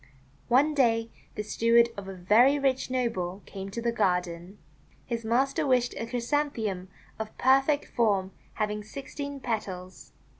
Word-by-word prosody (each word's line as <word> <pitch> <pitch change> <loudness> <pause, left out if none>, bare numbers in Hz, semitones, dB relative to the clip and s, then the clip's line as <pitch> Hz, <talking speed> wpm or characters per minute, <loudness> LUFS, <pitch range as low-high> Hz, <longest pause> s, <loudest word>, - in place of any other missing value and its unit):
One 275 +5 +4
day 230 -5 +2 0.2
the 210 - -3
steward 230 +2 +4
of 200 -1 -7
a 195 - -6
very 220 +10 +4
rich 270 -2 0
noble 205 -7 -2
came 195 -1 -7
to 230 +4 -5
the 235 - +1
garden. 180 -3 -1 0.5
His 235 -1 -3
master 270 +7 +1
wished 250 -2 +2
a 230 - -4
Chrysanthe 280 +5 -1
mum 185 -2 -3 0.3
of 220 0 -6
perfect 270 +3 +3
form 200 -5 +1 0.2
having 210 -1 -2
sixteen 280 +4 -7
petals. 190 -7 -5
230 Hz, 145 wpm, -28 LUFS, 195-260 Hz, 0.5 s, One